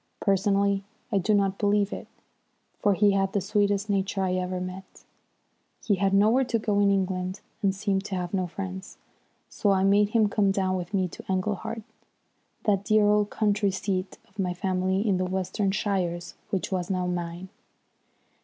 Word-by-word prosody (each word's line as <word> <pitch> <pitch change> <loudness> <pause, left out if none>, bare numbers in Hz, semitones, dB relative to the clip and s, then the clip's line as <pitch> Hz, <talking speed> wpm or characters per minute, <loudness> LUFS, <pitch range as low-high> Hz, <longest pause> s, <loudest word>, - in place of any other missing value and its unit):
Personally 200 0 +2 0.3
I 200 - +3
do 210 +3 +2
not 195 -1 +1
believe 205 -1 +2
it, - - -7 0.7
for 205 -1 +3
he 205 +1 +4
had 195 -1 +1
the 200 - +2
sweetest 205 +1 +1
nature 195 -1 0
I 185 -1 0
ever 185 0 -2
met. 185 +1 -8 0.8
He 205 -3 +2
had 195 +1 +2
nowhere 215 +7 +4
to 235 -2 0
go 215 -1 -1
to - - +4
in 200 - +4
England 185 0 -1 0.2
and 195 -2 +1
seemed 195 -1 0
to 195 - -3
have 180 0 -3
no 185 -2 0
friends. 190 +1 -7 0.5
So 205 - -1
I 190 -1 +3
made 200 +1 +4
him 220 -1 +3
come 205 -1 +2
down 190 -1 +1
with 180 -1 -4
me 185 -2 +2
to - - -10
Englehart, 210 +4 -2 0.8
that 200 -3 +2
dear 215 0 +4
old 210 0 +3
country 205 -1 +1
seat 190 0 -3
of 200 +1 -22
my 180 -2 0
family 190 +2 0
in 195 -3 +3
the 185 - 0
Western 190 +2 -1
shires 185 -4 -1 0.2
which 195 -1 -2
was 180 -1 -2
now 185 -2 0
mine. 175 +1 -4
195 Hz, 180 wpm, -26 LUFS, 185-205 Hz, 0.8 s, he